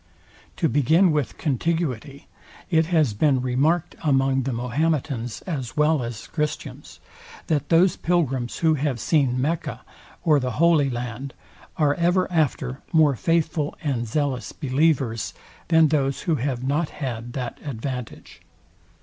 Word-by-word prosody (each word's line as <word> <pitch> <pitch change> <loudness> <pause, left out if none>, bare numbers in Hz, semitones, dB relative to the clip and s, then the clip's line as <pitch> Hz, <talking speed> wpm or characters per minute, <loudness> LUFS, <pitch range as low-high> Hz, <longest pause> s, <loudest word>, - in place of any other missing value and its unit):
To 165 - +1
begin 160 +6 +4
with 150 -4 -1
contiguity; 145 -2 -2 0.4
it 160 -1 +3
has 155 -9 +2
been 135 +5 +2
remarked 145 +7 +1
among 135 -2 +2
the - - -1
Mahometans 125 0 -1
as 140 -9 -5
well 150 -1 +3
as 115 -2 -6
Christians, 150 -2 -5 0.5
that 155 -4 -1
those 175 +2 +4
pilgrims, 135 -8 0
who 160 - +5
have 140 -4 -1
seen 130 -1 +1
MECCA 155 +5 -2 0.4
or 150 -3 +4
the 125 -2 -2
HOLY 160 -3 +3
LAND, 125 +2 -5 0.4
are 150 -2 +3
ever 175 +3 +2
after 140 -5 0
more 155 -5 +4
faithful 160 +1 0
and 125 -6 -1
zealous 135 0 -1
believers, 135 -5 0 0.3
than 160 -2 +5
those 140 -3 0
who 170 - 0
have 125 -1 -2
not 145 +4 0
had 120 -4 -5
that 125 -3 -5
advantage. 125 -2 -6
145 Hz, 130 wpm, -24 LUFS, 125-160 Hz, 0.5 s, who